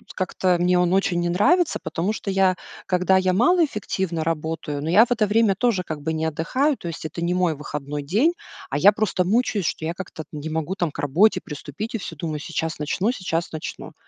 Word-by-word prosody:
как-то 185 Hz, -1 st, +1 dB
мне 180 Hz, +1 st, +3 dB
он 180 Hz, 0 st, +2 dB
очень 190 Hz, -2 st, +2 dB
не 175 Hz, -, 0 dB
нравится, 330 Hz, -, +3 dB
потому 165 Hz, +6 st, -2 dB
что 215 Hz, -, -5 dB
я, 190 Hz, -1 st, +3 dB, 0.3 s
когда 185 Hz, +1 st, +3 dB
я 185 Hz, -1 st, +2 dB
малоэффективно 210 Hz, -, +1 dB
работаю, 160 Hz, -2 st, -3 dB
но 160 Hz, -, -2 dB
я 205 Hz, +7 st, +7 dB
в 245 Hz, -, -15 dB
это 230 Hz, -3 st, +3 dB
время 210 Hz, -1 st, +3 dB
тоже, 215 Hz, -3 st, +1 dB
как 155 Hz, -3 st, -6 dB
бы, 160 Hz, +2 st, -2 dB
не 160 Hz, 0 st, -1 dB
отдыхаю, 250 Hz, -, 0 dB
то 170 Hz, -, -8 dB
есть 165 Hz, -1 st, -7 dB
это 170 Hz, +2 st, -4 dB
не 175 Hz, +1 st, +1 dB
мой 180 Hz, -3 st, +1 dB
выходной 145 Hz, 0 st, -5 dB
день, 225 Hz, -, +2 dB, 0.4 s
а 135 Hz, -, -1 dB
я 195 Hz, +7 st, +7 dB
просто 210 Hz, -3 st, 0 dB
мучаюсь, 210 Hz, -2 st, +1 dB
что 160 Hz, -, -2 dB
я 165 Hz, -, -2 dB
как-то 175 Hz, -3 st, -8 dB
не 150 Hz, +1 st, -5 dB
могу 160 Hz, +3 st, -2 dB
там 175 Hz, -5 st, -1 dB
к -, -, -11 dB
работе 165 Hz, +10 st, +3 dB
приступить 150 Hz, -, -6 dB
и -, -, +1 dB
всё 180 Hz, -5 st, -7 dB
думаю: 155 Hz, 0 st, -3 dB
"Сейчас 160 Hz, +1 st, -3 dB
начну, 180 Hz, +9 st, 0 dB
сейчас 170 Hz, -7 st, -3 dB
начну". 155 Hz, -1 st, -7 dB
180 Hz, 215 wpm, -23 LUFS, 160-205 Hz, 0.4 s, я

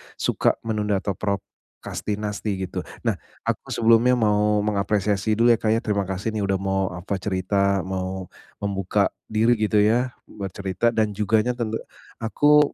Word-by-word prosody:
suka -, -, +1 dB
menunda 105 Hz, -2 st, 0 dB
atau 100 Hz, -, 0 dB
prokrastinasi 105 Hz, +1 st, -4 dB
gitu. 90 Hz, -, -4 dB, 0.2 s
Nah, -, -, 0 dB, 0.2 s
aku -, -, -2 dB
sebelumnya 115 Hz, +2 st, +4 dB
mau 105 Hz, -2 st, +2 dB
mengapresiasi 105 Hz, 0 st, +1 dB
dulu 120 Hz, +2 st, +5 dB
ya, 115 Hz, -, +3 dB
Kak, 110 Hz, 0 st, +2 dB
ya. -, -, +2 dB
Terima 100 Hz, -3 st, 0 dB
kasih 95 Hz, +4 st, -2 dB
nih 110 Hz, -, -3 dB
udah 100 Hz, -, +2 dB
mau, 95 Hz, 0 st, 0 dB
apa, 95 Hz, +2 st, -3 dB
cerita, 100 Hz, 0 st, +1 dB
mau 95 Hz, 0 st, -4 dB, 0.3 s
membuka 100 Hz, 0 st, +1 dB, 0.2 s
diri 110 Hz, +2 st, +3 dB
gitu 105 Hz, 0 st, +2 dB
ya 115 Hz, +5 st, +3 dB, 0.2 s
buat 100 Hz, -2 st, -6 dB
cerita 95 Hz, +4 st, 0 dB
dan 110 Hz, -2 st, 0 dB
juganya 110 Hz, +4 st, +2 dB
tentu 115 Hz, -2 st, -2 dB, 0.4 s
aku 145 Hz, +6 st, +4 dB
105 Hz, 150 wpm, -24 LUFS, 100-110 Hz, 0.4 s, dulu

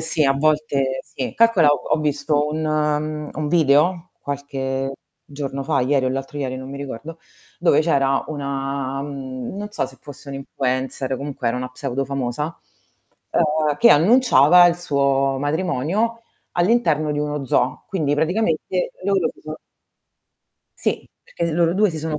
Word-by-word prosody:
sì, 160 Hz, -1 st, 0 dB
a 135 Hz, -, +4 dB
volte 140 Hz, -2 st, +1 dB
sì, 130 Hz, -, -6 dB
calcola, 230 Hz, -9 st, +5 dB
ho 145 Hz, +1 st, +1 dB
visto 145 Hz, 0 st, 0 dB
un 150 Hz, 0 st, -1 dB
un 155 Hz, -1 st, -3 dB
video 165 Hz, +3 st, +3 dB
qualche 135 Hz, -1 st, -3 dB, 0.3 s
giorno 140 Hz, -1 st, -5 dB
fa, -, -, +1 dB
ieri 130 Hz, +1 st, +2 dB
o -, -, +2 dB
l'altro 135 Hz, +3 st, -4 dB
ieri, 130 Hz, -2 st, -3 dB
non 130 Hz, +1 st, -8 dB
mi 140 Hz, -, -6 dB
ricordo, 140 Hz, +4 st, -7 dB, 0.4 s
dove 170 Hz, -4 st, +4 dB
c'era 135 Hz, -4 st, +2 dB
una 135 Hz, -2 st, -3 dB
mhmm, 135 Hz, 0 st, -6 dB
non 205 Hz, +1 st, -5 dB
so 170 Hz, -, -2 dB
se 130 Hz, -, -15 dB
fosse 145 Hz, 0 st, -12 dB
un 140 Hz, -, -6 dB
influencer, 130 Hz, -1 st, -2 dB
comunque 140 Hz, -3 st, -3 dB
era 115 Hz, -, -1 dB
una 125 Hz, 0 st, -3 dB
pseudo 135 Hz, +1 st, -3 dB
famosa, 140 Hz, +4 st, -3 dB, 0.7 s
ehm, 155 Hz, -2 st, +1 dB
che -, -, +7 dB
annunciava 175 Hz, -, +6 dB
il 170 Hz, -1 st, +2 dB
suo 140 Hz, -4 st, +1 dB
matrimonio 175 Hz, -, -1 dB, 0.3 s
all'interno 175 Hz, -6 st, +2 dB
di 145 Hz, -, -2 dB
uno 150 Hz, -1 st, -2 dB
zoo. 125 Hz, +1 st, 0 dB
Quindi 155 Hz, -7 st, 0 dB
praticamente 180 Hz, +2 st, 0 dB
loro 195 Hz, -3 st, +2 dB
si -, -, -22 dB
sono 155 Hz, 0 st, -6 dB, 1.2 s
Sì, -, -, -2 dB, 0.2 s
perché 170 Hz, -1 st, -3 dB
loro 170 Hz, +1 st, +2 dB
2 205 Hz, +1 st, +3 dB
si 160 Hz, -, -5 dB
sono 155 Hz, 0 st, -3 dB
145 Hz, 150 wpm, -21 LUFS, 135-160 Hz, 1.2 s, che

